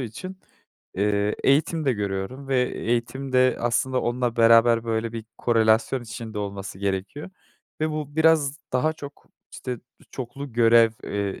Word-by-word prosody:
için, 185 Hz, -, -7 dB, 0.6 s
eee, 100 Hz, +1 st, +1 dB
eğitim 155 Hz, +3 st, +2 dB
de 135 Hz, -, +3 dB
görüyorum 105 Hz, +6 st, -4 dB
ve 130 Hz, -2 st, +2 dB
eğitim 125 Hz, +3 st, -2 dB
de 130 Hz, 0 st, +4 dB
aslında 125 Hz, +2 st, 0 dB
onunla 120 Hz, -1 st, -1 dB
beraber 115 Hz, 0 st, +5 dB
böyle 115 Hz, 0 st, -2 dB
bir 115 Hz, -1 st, -6 dB
korelasyon 115 Hz, +2 st, +2 dB
içinde 110 Hz, -1 st, -7 dB
olması 100 Hz, -2 st, -5 dB
gerekiyor 100 Hz, -, -3 dB, 0.5 s
ve 155 Hz, 0 st, 0 dB
bu 150 Hz, -1 st, -5 dB
biraz 160 Hz, -3 st, +3 dB, 0.2 s
daha 130 Hz, +5 st, +2 dB
çok 145 Hz, -2 st, -11 dB, 0.3 s
işte 125 Hz, -3 st, -5 dB, 0.3 s
çoklu 130 Hz, +1 st, -7 dB
görev, 115 Hz, -1 st, +5 dB
eee, 100 Hz, -1 st, -3 dB
120 Hz, 135 wpm, -24 LUFS, 110-135 Hz, 0.6 s, beraber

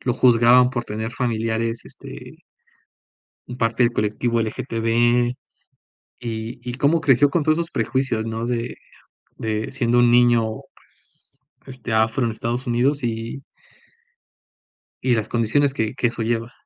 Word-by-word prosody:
lo 125 Hz, -, 0 dB
juzgaban 125 Hz, 0 st, +5 dB
por 120 Hz, -2 st, -3 dB
tener 110 Hz, +2 st, -4 dB
familiares, 115 Hz, 0 st, -2 dB
este -, -, -10 dB, 1.1 s
en 125 Hz, -, -7 dB
parte 115 Hz, +1 st, +1 dB
del 120 Hz, -, +3 dB
colectivo 115 Hz, +2 st, 0 dB
LGTB. 120 Hz, +1 st, +1 dB, 0.8 s
Y 115 Hz, 0 st, -5 dB
y -, -, -4 dB
cómo 145 Hz, +5 st, +2 dB
creció 145 Hz, -2 st, +4 dB
con 170 Hz, +2 st, +1 dB
todos 155 Hz, +2 st, +2 dB
esos 170 Hz, 0 st, -2 dB
prejuicios, 120 Hz, -2 st, -1 dB
¿no?, 115 Hz, +1 st, -3 dB
de 120 Hz, -1 st, -3 dB, 0.6 s
de 110 Hz, +1 st, -3 dB
siendo 120 Hz, -2 st, +2 dB
un 120 Hz, -1 st, +5 dB
niño, 120 Hz, -1 st, +5 dB, 0.3 s
pues, -, -, -18 dB, 0.2 s
este, 125 Hz, -3 st, -6 dB
afro 110 Hz, +3 st, +2 dB
en 115 Hz, -, 0 dB
Estados 120 Hz, +4 st, -3 dB
Unidos 130 Hz, +4 st, +1 dB
y 115 Hz, +3 st, -4 dB, 1.6 s
y 125 Hz, -1 st, +2 dB
las 110 Hz, -2 st, -2 dB
condiciones 135 Hz, +5 st, +1 dB
que 110 Hz, -2 st, -2 dB
que 125 Hz, -, 0 dB
eso 115 Hz, -1 st, -4 dB
lleva. 115 Hz, +1 st, -2 dB
120 Hz, 140 wpm, -22 LUFS, 115-125 Hz, 1.6 s, juzgaban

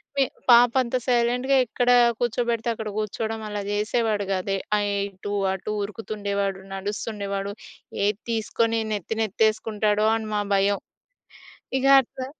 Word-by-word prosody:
మీ 275 Hz, -, +4 dB, 0.3 s
పాప 240 Hz, 0 st, +8 dB
అంత 240 Hz, +1 st, -4 dB
సైలెంట్‌గా 250 Hz, +2 st, +2 dB
ఎక్కడ 245 Hz, +1 st, -1 dB, 0.3 s
కూర్చోబెడితే 235 Hz, -1 st, 0 dB
అక్కడ 220 Hz, -1 st, -5 dB
కూర్చోవడం 220 Hz, +1 st, -3 dB
అలా 205 Hz, -1 st, -3 dB
చేసేవాడు 210 Hz, 0 st, 0 dB
కాదు. 195 Hz, +1 st, -1 dB, 0.2 s
ఆహ్, 205 Hz, 0 st, 0 dB, 0.2 s
ఇటూ, 200 Hz, +2 st, -7 dB, 0.2 s
అటు 190 Hz, +2 st, -5 dB
ఉరుకుతుండేవాడు, 200 Hz, -2 st, -3 dB
నడుస్తుండేవాడు. 200 Hz, 0 st, -4 dB, 0.5 s
ఏది 205 Hz, +1 st, 0 dB
తీసుకొని 225 Hz, +1 st, 0 dB
నెత్తి 210 Hz, +2 st, -3 dB
నెత్తె‌సుకుంటాడో 215 Hz, 0 st, +1 dB
అని 220 Hz, -1 st, -4 dB
మా 205 Hz, -, +1 dB
భయం. 200 Hz, +1 st, +2 dB, 1.0 s
ఇగ 265 Hz, -, 0 dB, 0.2 s
అట్లా 260 Hz, +1 st, -8 dB
215 Hz, 120 wpm, -24 LUFS, 205-235 Hz, 1.0 s, పాప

